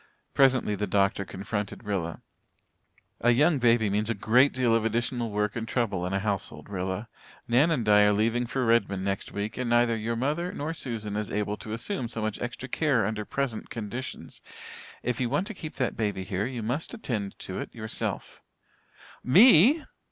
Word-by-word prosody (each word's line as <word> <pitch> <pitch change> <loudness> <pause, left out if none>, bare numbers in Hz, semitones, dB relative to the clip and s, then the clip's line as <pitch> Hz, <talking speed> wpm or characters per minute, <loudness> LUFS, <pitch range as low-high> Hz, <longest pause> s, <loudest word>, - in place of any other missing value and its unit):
Presently 130 -5 +3
the 105 +1 -2
doctor 100 +1 +1
confronted 105 +3 -5
Rilla. 95 -6 -3 1.0
"A 120 - +3
young 145 +5 +4
baby 115 -3 +4
means 105 +2 0
a 115 - 0
great 125 +7 +4
deal 125 -3 +1
of 115 -1 +2
additional 115 +1 -1
work 105 0 -1
and 115 -1 -4
trouble 100 -8 -1
in - - -4
a - - +2
household, 100 -1 -3
Rilla. 95 +3 -3 0.4
Nan 130 +7 +4
and 135 -9 0
Di 105 -1 +6
are 105 - +5
leaving 115 +4 +1
for 130 +1 -1
Redmond 100 -4 +2
next 100 -1 -2
week 105 +4 -4
and 125 -2 -1
neither 120 -1 +3
your 115 +1 -2
mother 150 +9 -1
nor 155 +3 -3
Susan 110 -9 -4
is 105 -1 -2
able 105 0 -1
to 110 - -8
assume 125 - -2
so 115 - -4
much 110 -1 -3
extra 120 +1 -5
care 135 -5 +1
under 105 0 -3
present 135 -4 -3
conditions. 120 +4 -6 0.6
If 125 0 -1
you 120 - 0
want 180 - 0
to 220 - -6
keep 160 -5 -8
that 130 -3 -1
baby 105 -4 -2
here 95 +2 -2
you 125 -3 -5
must 140 - -3
attend 110 - -4
to 95 - -6
it - - -6
yourself." 110 -1 -4 0.8
"Me!" 230 - +7
115 Hz, 185 wpm, -27 LUFS, 105-125 Hz, 1.0 s, Me